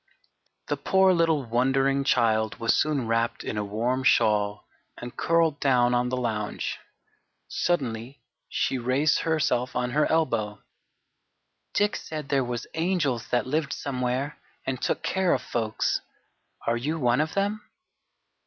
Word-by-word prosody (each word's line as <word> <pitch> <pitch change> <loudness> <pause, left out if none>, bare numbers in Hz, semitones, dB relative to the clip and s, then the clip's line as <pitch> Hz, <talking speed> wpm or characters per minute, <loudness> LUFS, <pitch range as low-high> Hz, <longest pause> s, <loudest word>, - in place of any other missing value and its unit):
The - - -1
poor 190 -1 +4
little, 165 -4 +2
wondering 135 +3 +2
child 110 -5 +2
was 115 -1 +2
soon 150 -5 +1
wrapped 115 +1 0
in - - -4
a 105 - -1
warm 120 +6 -1
shawl 105 -4 +2 0.3
and 120 0 -8
curled 165 -3 +2
down 125 -3 +3
on 125 0 +1
the 130 - -1
lounge. 110 -4 -2 0.7
Suddenly 130 -6 -2 0.3
she 130 - 0
raised 130 +5 +2
herself 140 -6 0
on 125 0 -1
her 150 +3 +2
elbow: 115 -10 0 1.1
"Dick 205 0 +2
said 155 -3 -6
there 135 -2 +2
was 120 -1 -4
angels 160 - 0
that 120 - +1
lived 145 +1 -1
somewhere 130 +1 -2 0.3
and 130 -1 -3
took - - -1
care 190 -2 +2
of - - -4
folks. 110 -2 -1 0.6
Are 115 0 +1
you 150 +7 -2
one 125 -1 +2
of 155 +1 -3
them?" 205 +2 0
130 Hz, 140 wpm, -26 LUFS, 120-155 Hz, 1.1 s, poor